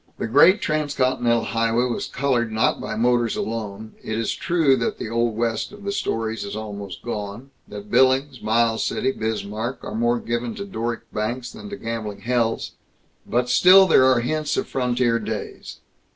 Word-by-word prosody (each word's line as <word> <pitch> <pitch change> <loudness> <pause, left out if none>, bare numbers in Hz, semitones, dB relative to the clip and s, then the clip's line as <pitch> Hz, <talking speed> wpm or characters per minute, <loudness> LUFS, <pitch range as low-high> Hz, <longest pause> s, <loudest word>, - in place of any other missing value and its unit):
The - - -3
Great 145 - +5
Transcontinental 130 -6 +1
Highway 115 +2 +1
was 120 -2 -3
colored 125 -4 0
not 110 0 +1
by 110 - -4
motors 120 0 +2
alone. 110 -1 -5
It 110 - -3
is 115 -1 -1
true 160 -6 +2
that 115 - -2
the - - -5
Old 115 -1 0
West 115 -1 -1
of 205 0 -13
the 200 - -2
stories 115 - -2
is 100 - -6
almost 100 -3 -7
gone; 110 +3 -6 0.2
that 105 0 -9
Billings, 130 +1 +3
Miles 115 +1 +1
City, 130 - 0
Bismarck, 110 +1 -4
are - - -6
more 120 +2 +1
given 120 0 -3
to 200 - -5
Doric 120 - -3
banks 120 +4 -3
than 205 - -10
to 205 - -5
gambling 110 -3 -5
hells. 120 -2 0 0.6
But 125 +1 0
still 185 +10 +7
are 190 - 0
there 130 -1 +5
hints 155 +5 -1
of - - 0
frontier 125 -2 +1
days. 110 -1 -6
120 Hz, 170 wpm, -23 LUFS, 110-130 Hz, 0.6 s, still